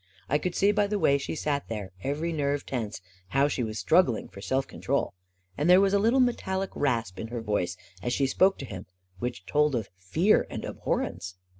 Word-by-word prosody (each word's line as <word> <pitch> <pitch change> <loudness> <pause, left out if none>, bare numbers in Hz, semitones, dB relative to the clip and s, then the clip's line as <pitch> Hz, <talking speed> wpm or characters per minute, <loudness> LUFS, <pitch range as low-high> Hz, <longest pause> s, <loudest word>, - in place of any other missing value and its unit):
I 145 - +2
could 180 +3 -3
see 200 +1 +4
by 205 0 +2
the 210 0 -1
way 140 -6 +3
she 140 - -4
sat 145 -2 -1
there, 105 -4 -5
every 155 +5 -1
nerve 145 -2 -1
tense, 110 -7 -4 0.3
how 135 +8 +3
she 140 - -2
was 110 -2 -3
struggling 160 - +3
for 100 - -11
self 130 +5 0
control. 140 -6 -1 0.4
And 150 +4 0
there 180 +1 +8
was 195 0 +3
a 200 - +4
little 230 +6 +3
metallic 195 -6 0
rasp 115 -9 -1
in 110 - -4
her 120 +1 -4
voice 105 -5 -1 0.2
as 120 - -2
she 135 +2 +2
spoke 190 +8 +3
to 135 - -6
him 95 -7 -8 0.3
which 120 +2 -4
told 150 -2 +2
of 110 -4 -2
fear 160 - +2
and - - -5
abhorrence. 90 +1 -3
140 Hz, 205 wpm, -28 LUFS, 115-180 Hz, 0.4 s, there